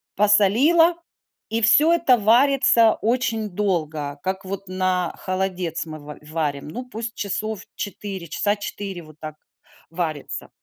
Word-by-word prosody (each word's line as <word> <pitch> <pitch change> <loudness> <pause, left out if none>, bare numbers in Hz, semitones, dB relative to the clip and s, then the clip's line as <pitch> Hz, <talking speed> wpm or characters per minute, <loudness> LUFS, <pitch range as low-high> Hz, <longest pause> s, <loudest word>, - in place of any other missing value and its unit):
посолила, 220 - +4 0.6
и 225 +1 -1
всё 290 +9 +5
это 275 -8 +4
варится 235 0 +5
очень 225 -2 0
долго, 155 -7 -2
как 190 +2 -3
вот 195 0 -6
на 185 -1 -1
холодец 185 -3 -2
мы 155 -1 -7
в 150 0 -10
варим. 150 -3 -2
Ну, 250 +11 -6
пусть 230 -1 -6
часов 210 +1 -3
4, 195 -3 -6
часа 205 +6 0
4, 200 -3 -6
вот 155 -2 -15
так 155 -1 -7 0.6
варится. 165 -4 -4
200 Hz, 130 wpm, -22 LUFS, 170-225 Hz, 0.6 s, всё